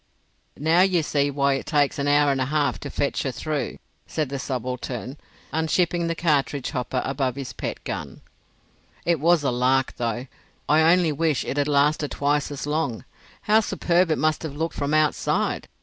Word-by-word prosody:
"Now, 160 +4 +3
you 185 -3 +3
see 145 -1 +1
why 140 0 +1
it 135 - -4
takes 145 -2 +1
an 140 - 0
hour 145 0 +4
and 135 -1 0
a - - +1
half 145 -7 0
to - - -6
fetch - - -1
her - - -2
through," - - -3 0.3
said 155 -4 -2
the 140 0 -4
subaltern, 125 0 -4 0.4
unshipping 170 +2 +1
the 165 - -1
cartridge 145 -5 0
hopper 125 -2 -2
above 135 -2 -1
his 135 -3 -6
pet - - -5
gun. - - -6 0.8
"It 170 -2 +2
was 165 +1 +3
a 135 - +1
lark, 130 +2 +1
though. 120 +1 -2 0.4
I 160 +2 +5
only 175 -3 +3
wish 155 -1 0
it 140 - -3
had 145 0 +1
lasted 145 +1 +2
twice 145 0 0
as 145 -1 -5
long. 150 -6 -2 0.4
How 215 +1 +5
superb 180 -4 +1
it 155 - +1
must 155 +3 +1
have 155 -3 -5
looked 165 +2 -2
from 145 +1 -1
outside!" 155 -1 +1
145 Hz, 180 wpm, -24 LUFS, 135-160 Hz, 0.8 s, I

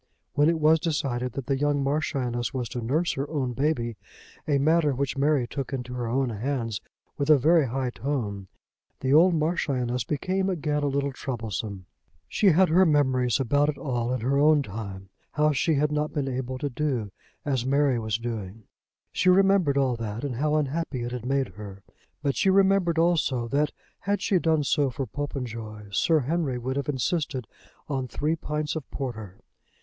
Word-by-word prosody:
When 145 +1 +4
it 165 -1 +1
was 160 +1 +5
decided 135 -7 -2
that 135 - -5
the 135 -1 0
young 145 -1 +1
Marchioness 135 -4 -1
was 125 -2 -2
to 120 - -4
nurse 155 +9 +1
her 135 +2 -3
own 135 -5 -2
baby, 120 -4 -1 0.5
a 145 -2 +3
matter 150 0 +3
which 140 +2 -1
Mary 140 -2 +2
took 135 +1 -5
into 125 -1 -4
her 120 -2 -3
own 130 +1 0
hands 115 -1 -2 0.4
with 140 +1 -1
a 155 - +8
very 155 +2 +4
high 130 +1 -2
tone, 110 -9 -3 0.5
the 130 +1 +1
old 170 +3 +6
Marchioness 140 -6 0
became 185 +6 -1
again 150 -5 -1
a 145 - +1
little 140 0 0
troublesome. 110 -6 -5 0.4
She 210 - +1
had 185 +1 +5
her 180 +4 +5
memories 130 -7 +2
about 145 +3 +2
it 145 - -3
all 120 -5 -2
in 130 -2 -1
her 135 +4 +1
own 150 0 +5
time; 100 -3 -7 0.2
how 150 0 +3
she 150 +3 +1
had 150 +1 +1
not 150 0 -1
been 140 -2 -1
able 130 0 -3
to 145 +2 -2
do 125 -7 -2 0.3
as 135 -4 0
Mary 135 -1 +2
was 110 -1 -1
doing. 115 -3 -6 0.5
She 185 - +2
remembered 190 -6 +4
all 130 -3 +2
that, 115 +1 -5
and 130 -5 -3
how 150 +3 +1
unhappy 150 -3 -1
it 120 - -4
had 125 -1 -5
made 135 -2 +1
her; 100 0 -10 0.4
but 140 -2 +1
she 195 - +2
remembered 190 -3 +3
also 160 -8 +2
that, 145 +3 +1 0.3
had 200 +2 -1
she 190 - +2
done 160 -3 +2
so 140 +1 +2
for 135 +2 -4
Popenjoy, 115 -6 -6
Sir 155 - +3
Henry 145 -1 -1
would 130 +2 -3
have 140 0 -2
insisted 140 -2 -1 0.4
on 135 -3 -2
three 150 +6 -1
pints 150 -1 -3
of 155 -4 -6
porter. 110 -8 -6
140 Hz, 185 wpm, -26 LUFS, 120-150 Hz, 0.5 s, a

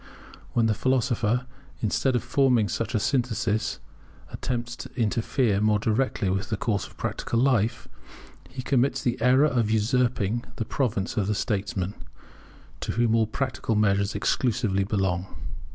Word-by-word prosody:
When 115 - +3
the 110 - +3
philosopher, 125 -1 +1 0.3
instead 125 +4 +1
of 120 - 0
forming 125 -3 +3
such 115 +5 -2
a - - +3
synthesis, 115 -3 0 0.5
attempts 120 -1 -3
to - - -8
interfere 110 -1 +1
more 105 0 +3
directly 110 0 0
with 95 +3 -2
the 110 - -1
course 105 -4 -1
of - - -19
practical 115 - -2
life, 120 -3 +1 0.6
he 130 -1 -6
commits 135 0 +1
the 120 -1 -1
error 130 +4 +5
of 120 -7 +1
usurping 115 0 +1
the 115 - -3
province 115 -8 -1
of 100 -3 +1
the 105 - 0
statesman, 100 -2 -2 0.9
to - - -3
whom 115 -1 +2
all 115 -1 +3
practical 125 -2 -2
measures 100 -1 +2
exclusively 115 -6 +1
belong. 95 -2 -1
115 Hz, 145 wpm, -26 LUFS, 105-125 Hz, 0.9 s, error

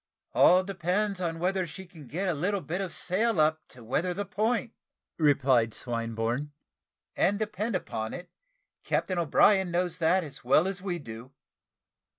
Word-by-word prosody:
"All 185 +1 +6
depends 195 +1 -1
upon 165 -2 -2
whether 185 +1 0
she 190 +5 -9
can 160 -6 -14
get 185 +8 -2
a 180 - +1
little 185 +6 -1
bit 175 +4 -3
of 190 -3 -3
sail 200 +2 0
up 155 +1 +3
to 125 -2 -13
weather 170 +10 -1
the 205 +2 -3
point," 230 +3 -1 0.5
replied 130 -7 +3
Swinburne; 115 +3 -2 0.6
"and 200 +2 +2
depend 215 0 -2
upon 110 -10 -3
it, 175 0 -10 0.5
Captain 185 -2 -1
O'Brien 190 +4 +4
knows 175 0 -1
that 175 +3 +3
as 140 -3 -10
well 140 +8 +4
as 195 -1 -4
we 185 -2 -2
do." 120 -2 -10
175 Hz, 160 wpm, -28 LUFS, 145-190 Hz, 0.6 s, All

